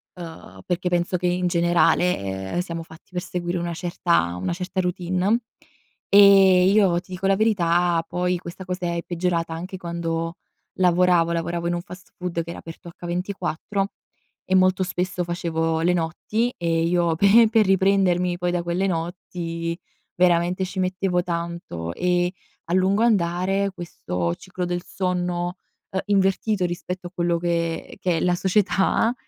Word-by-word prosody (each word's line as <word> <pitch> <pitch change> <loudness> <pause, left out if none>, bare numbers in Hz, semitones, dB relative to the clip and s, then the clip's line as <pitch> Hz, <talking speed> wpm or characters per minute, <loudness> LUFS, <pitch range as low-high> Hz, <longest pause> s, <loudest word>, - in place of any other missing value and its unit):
ehm, 165 -2 -10
perché 180 0 -1
penso 175 +1 0
che 180 0 -1
in 180 0 +1
generale, 175 +1 +3 0.4
ehm, - - +1
siamo 170 -2 -4
fatti 160 0 -16
per 180 - -2
seguire 175 -1 -3
una 170 0 -3
certa 170 - 0
una 95 - -2
certa 185 +1 -4
routine. 185 +5 0 0.7
Ehm, 195 -2 +7
io 190 -5 +4
ti 185 - -19
dico 190 +2 -2
la 195 - +4
verità, 175 -5 +2
poi 180 +1 0
questa 175 +2 -9
cosa 180 -1 -3
è 170 - -2
peggiorata 170 -1 -1
anche 180 +4 -6
quando 170 0 -3 0.4
lavoravo, 180 -2 +3
lavoravo 170 +1 -2
in 175 - 0
un 175 - -3
fast 180 0 -13
food 180 -2 -2
che 170 - -7
era - - -8
aperto 165 +1 -10
H24 180 +2 -3 0.6
e 190 - +3
molto 185 0 +4
spesso 180 0 -2
facevo 165 -2 -1
le 175 +2 +3
notti 180 +8 -1
e 165 -1 0
io 170 -1 +2
pe 205 +6 +6
per 220 -2 +4
riprendermi 185 -2 +2
poi 180 0 0
da 175 -1 -1
quelle 175 +3 0
notti 170 -1 -4 0.4
veramente 180 +1 +2
ci 190 +1 -6
mettevo 185 -1 0
tanto 170 - -4
e, 180 - +1 0.3
a 170 - -3
lungo 190 +4 +3
andare, 195 -2 +1
questo 90 - -3
ciclo 185 - -5
del 175 0 -2
sonno, 180 -1 -2 0.3
ehm, 190 - -1
invertito 195 0 +2
rispetto 180 +1 -4
a 175 - -13
quello 175 -1 +1
che 170 -1 -2
che 175 -3 +1
è - - -1
la 180 0 +2
società, 195 +4 +2
180 Hz, 155 wpm, -23 LUFS, 170-185 Hz, 0.7 s, Ehm